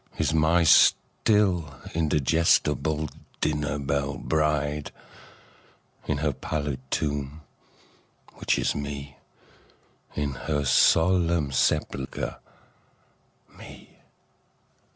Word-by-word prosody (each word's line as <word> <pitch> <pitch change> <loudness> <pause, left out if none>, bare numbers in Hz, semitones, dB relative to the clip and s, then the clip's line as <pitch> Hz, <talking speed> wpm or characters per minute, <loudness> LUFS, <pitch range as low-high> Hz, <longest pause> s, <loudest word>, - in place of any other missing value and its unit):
Is - - 0
n^y 80 +2 +3
still 90 -2 +3 0.2
indigestible 80 -1 +1 0.3
dinner 75 -1 -1
belle 70 0 -2
bride, 75 -1 -1 1.2
In 75 - 0
her 75 0 -1
pallid 75 -1 -4
tomb, 75 0 -3 1.0
which - - 0
is - - 0
Me, 70 -1 -6 1.0
In 75 -1 -1
her 75 +2 -2
solemn 85 +1 +3
sepulcher, 65 0 -1 1.2
Me. - - -14
75 Hz, 75 wpm, -26 LUFS, 70-80 Hz, 1.2 s, n^y